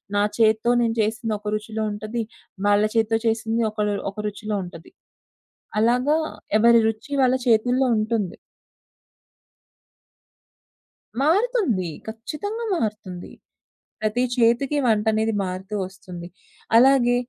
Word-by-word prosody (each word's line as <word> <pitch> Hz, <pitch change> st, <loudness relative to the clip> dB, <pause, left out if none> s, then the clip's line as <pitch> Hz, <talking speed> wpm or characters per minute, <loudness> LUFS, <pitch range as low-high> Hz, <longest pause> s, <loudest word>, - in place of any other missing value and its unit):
నా 205 Hz, -, +3 dB
చేత్తో 220 Hz, +1 st, +3 dB
నేను 230 Hz, -1 st, 0 dB
చేసింది 220 Hz, +1 st, -1 dB
ఒక 210 Hz, 0 st, -4 dB
రుచిలో 220 Hz, +1 st, -4 dB
ఉంటది. 215 Hz, +3 st, -4 dB, 0.4 s
వాళ్ళ 205 Hz, 0 st, +4 dB
చేత్తో 225 Hz, 0 st, +2 dB
చేసింది 225 Hz, +1 st, 0 dB
ఒకళ్ళ 210 Hz, -1 st, -1 dB, 0.2 s
ఒక 195 Hz, -, -27 dB
రుచిలో 210 Hz, +1 st, -4 dB
ఉంటది. 175 Hz, -1 st, -11 dB, 0.9 s
అలాగా 250 Hz, +7 st, +3 dB, 0.4 s
ఎవరి 235 Hz, +1 st, +6 dB
రుచి 225 Hz, +6 st, -7 dB
వాళ్ళ 255 Hz, 0 st, +3 dB
చేతుల్లో 245 Hz, +3 st, +3 dB
ఉంటుంది. 215 Hz, -4 st, -1 dB, 2.9 s
మారుతుంది. 340 Hz, -, +1 dB, 0.2 s
ఖచ్చితంగా 305 Hz, -, -5 dB
మారుతుంది. 210 Hz, -, -4 dB, 0.7 s
ప్రతి 215 Hz, +3 st, 0 dB
చేతికి 245 Hz, +4 st, +2 dB
వంటనేది 220 Hz, 0 st, +2 dB
మారుతూ 190 Hz, +2 st, -5 dB
వస్తుంది. 185 Hz, -2 st, -9 dB, 0.5 s
అలాగే 245 Hz, -1 st, +5 dB
220 Hz, 100 wpm, -23 LUFS, 210-240 Hz, 2.9 s, ఎవరి